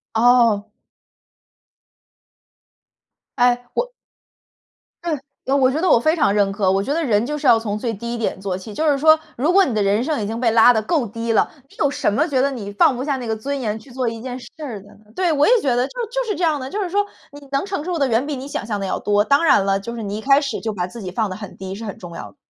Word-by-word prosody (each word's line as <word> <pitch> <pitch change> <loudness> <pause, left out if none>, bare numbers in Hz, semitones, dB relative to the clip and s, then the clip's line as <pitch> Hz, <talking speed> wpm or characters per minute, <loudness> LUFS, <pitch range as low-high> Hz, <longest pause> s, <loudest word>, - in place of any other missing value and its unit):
哦。 230 -3 +4 2.7
哎， 245 0 +2
我 - - -1 1.1
对。 335 -3 0 0.3
呃， 270 +2 +1
我 260 -1 +4
觉 300 - -1
得 365 +2 +1
我 - - +7
非 310 +7 +2
常 285 -11 +2
认 200 -1 +2
可。 195 -1 0
我 195 +1 +2
觉 280 - -1
得 335 - 0
人 225 -7 +1
就 300 +3 -3
是 290 -2 -1
要 230 - +7
从 210 -2 -3
最 230 0 -2
低 235 +3 -5
点 225 -4 -2
做 190 -2 -2
起， 205 +3 -9
就 315 - -1
是 285 -2 +3
说， 315 +2 +6 0.2
如 300 +8 +1
果 390 +1 +6
你 260 - -1
的 210 - +1
人 200 +3 +2
生 290 -4 -1
已 205 - -2
经 225 +2 -4
被 235 -3 +3
拉 230 +2 +7
得 220 - +1
够 270 0 0
低 230 +2 -3
了， 220 - +3 0.2
你 - - -20
有 285 - +3
什 240 - 0
么 300 +10 +2
觉 270 -5 +1
得 280 +1 +1
你 215 -6 -6
放 230 - +4
不 - - -4
下 280 +1 -1
那 255 -2 -5
个 225 - -1
尊 275 +6 -3
严， 215 -1 -2
去 265 - -17
做 250 -1 -2
一 225 0 -7
件 255 0 -5
事 240 - -11 0.2
儿 230 -9 -6
的 205 - -17
呢？ 215 - -23
对， 360 -3 +1
我 295 -1 +3
也 485 - +6
觉 260 -3 +1
得， 245 +2 +1
就 - - -15 0.2
就 - - -2
是 420 - 0
这 355 - -3
样 310 -3 +2
的， 260 +1 -6
就 415 - -3
是 360 - -4
说 405 +3 +2 0.3
你 285 -1 -13
能 275 +6 0
承 390 -5 -3
受 355 -2 -2
的， 280 - +2
远 230 +4 +1
比 290 -1 -3
你 260 +1 -7
想 280 - -4
象 210 -3 -2
的 195 - -3
要 - - -2
多。 205 0 +2
当 280 +5 +3
然 200 -9 +4
了， 195 0 +1
就 235 +4 -7
是 230 - -5
你 205 0 -4
一 220 - -6
开 275 +2 +4
始， 280 -1 -3
就 220 -2 -3
把 180 -2 -2
自 230 +5 -9
己 185 - -5
放 215 +1 -1
得 185 - -5
很 205 -3 -9
低， 190 0 -7
是 220 +3 -7
很 200 - -6
重 175 -2 -10
要 165 - -7
的。 100 - -23
240 Hz, 305 characters per minute, -20 LUFS, 210-285 Hz, 2.7 s, 我